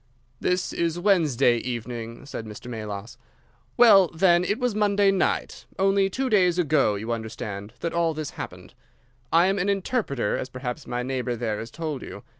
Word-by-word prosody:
"This 180 Hz, 0 st, 0 dB
is 170 Hz, 0 st, -1 dB
Wednesday 155 Hz, -, +3 dB
evening," 115 Hz, 0 st, -5 dB
said 115 Hz, -5 st, -6 dB
Mr. 105 Hz, +3 st, -9 dB
Melas. 110 Hz, 0 st, -6 dB, 0.6 s
"Well 205 Hz, -6 st, +7 dB
then, 175 Hz, +1 st, +3 dB
it 205 Hz, +4 st, 0 dB
was 250 Hz, -3 st, 0 dB
Monday 205 Hz, -1 st, +3 dB
night—only 195 Hz, +1 st, 0 dB
two 265 Hz, +6 st, -2 dB
days 180 Hz, -6 st, +3 dB
ago, 150 Hz, -, +2 dB
you 110 Hz, +4 st, -4 dB
understand—that 110 Hz, +4 st, -5 dB
all 170 Hz, -2 st, +1 dB
this 155 Hz, -2 st, -4 dB
happened. -, -, -9 dB, 0.6 s
I 170 Hz, +2 st, +5 dB
am 195 Hz, +1 st, +1 dB
an 190 Hz, +3 st, 0 dB
interpreter, 195 Hz, -, -1 dB
as 130 Hz, -, -4 dB
perhaps 130 Hz, +2 st, -6 dB
my 125 Hz, 0 st, -2 dB
neighbour 125 Hz, -1 st, -2 dB
there 110 Hz, -3 st, -2 dB
has 115 Hz, +1 st, -6 dB
told 155 Hz, -5 st, -4 dB
you. -, -, -9 dB
155 Hz, 160 wpm, -25 LUFS, 120-190 Hz, 0.6 s, Well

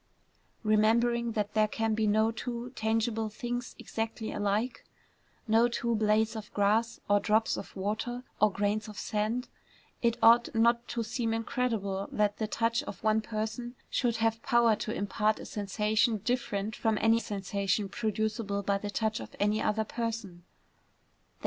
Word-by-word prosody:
Remembering 230 Hz, +2 st, +3 dB
that 210 Hz, -1 st, -2 dB
there 215 Hz, -1 st, +3 dB
can 225 Hz, +1 st, -1 dB
be 215 Hz, 0 st, +1 dB
no 220 Hz, +2 st, +3 dB
two 240 Hz, +1 st, -5 dB
tangible 225 Hz, -1 st, 0 dB
things 245 Hz, +3 st, -4 dB
exactly 225 Hz, 0 st, -4 dB
alike, 210 Hz, +4 st, -1 dB, 0.6 s
no 225 Hz, +2 st, +5 dB
two 235 Hz, 0 st, -1 dB
blades 220 Hz, +1 st, +2 dB
of 215 Hz, -1 st, -7 dB
grass, 215 Hz, +3 st, +2 dB
or 205 Hz, 0 st, +4 dB
drops 220 Hz, +1 st, +2 dB
of -, -, -8 dB
water, 220 Hz, +5 st, -3 dB, 0.2 s
or 215 Hz, -1 st, +5 dB
grains 205 Hz, +2 st, -1 dB
of 210 Hz, -2 st, -9 dB
sand, 220 Hz, +4 st, -1 dB, 0.5 s
it 235 Hz, -1 st, +2 dB
ought 235 Hz, +1 st, +6 dB
not 235 Hz, +1 st, +3 dB
to 235 Hz, -1 st, -2 dB
seem 225 Hz, 0 st, -1 dB
incredible 225 Hz, -5 st, -1 dB
that 205 Hz, -1 st, +1 dB
the 220 Hz, -, 0 dB
touch 230 Hz, +2 st, +1 dB
of -, -, -8 dB
one 215 Hz, 0 st, +3 dB
person 220 Hz, +3 st, -4 dB, 0.2 s
should 235 Hz, -2 st, +1 dB
have 225 Hz, 0 st, +1 dB
power 235 Hz, -2 st, +4 dB
to 215 Hz, -, -4 dB
impart 210 Hz, +1 st, 0 dB
a -, -, -8 dB
sensation 210 Hz, +2 st, +1 dB
different 215 Hz, -2 st, -2 dB
from 220 Hz, -1 st, +1 dB
any 225 Hz, +1 st, +4 dB
sensation 200 Hz, -1 st, -1 dB
producible 215 Hz, -1 st, -2 dB
by 200 Hz, 0 st, +1 dB
the 205 Hz, -, -4 dB
touch 220 Hz, +1 st, -1 dB
of -, -, -9 dB
any 210 Hz, +1 st, +2 dB
other 215 Hz, +1 st, +1 dB
person. 220 Hz, -6 st, -4 dB
220 Hz, 155 wpm, -30 LUFS, 210-230 Hz, 0.6 s, ought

